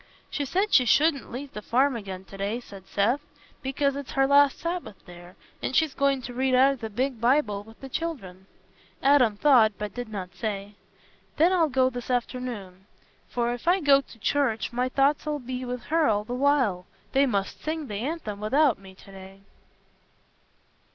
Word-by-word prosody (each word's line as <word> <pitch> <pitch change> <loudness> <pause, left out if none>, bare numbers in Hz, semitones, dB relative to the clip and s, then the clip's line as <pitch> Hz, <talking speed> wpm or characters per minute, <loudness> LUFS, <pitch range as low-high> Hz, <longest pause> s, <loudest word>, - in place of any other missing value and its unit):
"She 285 - -2
said 385 +10 0
she 250 - +6
shouldn't 285 +2 +2
leave 270 +3 -7
the 210 - -6
farm 260 +4 +2
again 190 -4 -6
to 195 - -12
day," 200 +4 -2
said 195 -6 -13
Seth, 235 +8 +1 0.4
"because 275 0 0
it's 280 -2 -6
her 270 0 +3
last 280 0 +5
Sabbath 340 - -4
there, 175 0 -13 0.3
and 260 - -3
she's 315 -3 +3
going 275 -2 +1
t' 245 - -7
read 260 +1 +1
out 265 +2 +6
o' - - -2
the 225 -2 -6
big 245 +2 -2
Bible 235 -5 +2
wi' 225 +1 -15
the 270 - -8
children." 215 - -5 0.6
Adam 255 -7 +4
thought—but 215 -7 +3
did 245 -2 -6
not 190 -4 -6
say—"Then 205 - -3
I'll 335 -4 +3
go 260 -1 +2
this 245 0 -7
afternoon; 235 -7 -4 0.4
for 240 0 -1
if 245 +7 -9
I 365 +2 +4
go 280 -4 +5
to 240 - -16
church, 235 -1 0
my 250 +1 0
thoughts 280 +3 +1
'ull 300 -1 -1
be 255 -1 -5
with 250 -1 -5
her 325 -2 +4
all 210 -1 +1
the 240 - -6
while. 250 -9 +1 0.2
They 275 +1 +3
must 200 -5 -2
sing 310 -1 -3
th' - - -9
anthem 220 -1 -4
without 260 +3 +2
me 190 -1 -14
to 195 - -16
day." 195 0 -12
250 Hz, 185 wpm, -26 LUFS, 210-280 Hz, 0.6 s, she